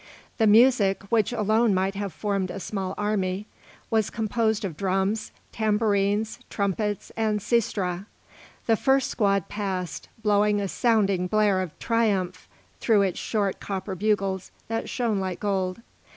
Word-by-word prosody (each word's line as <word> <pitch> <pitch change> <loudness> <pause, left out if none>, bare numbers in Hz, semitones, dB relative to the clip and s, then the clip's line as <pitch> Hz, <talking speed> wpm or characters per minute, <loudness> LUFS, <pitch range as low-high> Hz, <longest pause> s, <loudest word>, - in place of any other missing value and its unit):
The 220 - +4
music, 215 -3 +5
which 220 -2 +3
alone 220 -1 +2
might 190 +1 +1
have 200 -1 -4
formed 195 +3 -2
a 195 - -5
small 190 -1 -4
army, 205 -2 -1 0.5
was 220 -2 +2
composed 220 -1 0
of 175 -5 -4
drums, 195 +4 -1 0.2
tambourines, 210 -1 +1
trumpets, 205 0 -2
and 215 -2 0
sistra. 200 -4 -1 0.6
The 225 - +4
first 265 +3 +2
squad 200 -5 +1
passed, 190 -4 -4
blowing 210 0 +3
a 200 - -1
sounding 200 -4 +2
blare 205 -1 +2
of 180 -4 -6
triumph 205 -6 0 0.3
through 215 -4 +3
its 190 -3 -1
short 205 -3 -1
copper 195 0 -4
bugles 195 -1 0 0.2
that 225 0 -2
shone 230 -5 0
like 185 -2 -3
gold. 190 0 -1
205 Hz, 135 wpm, -25 LUFS, 190-220 Hz, 0.6 s, music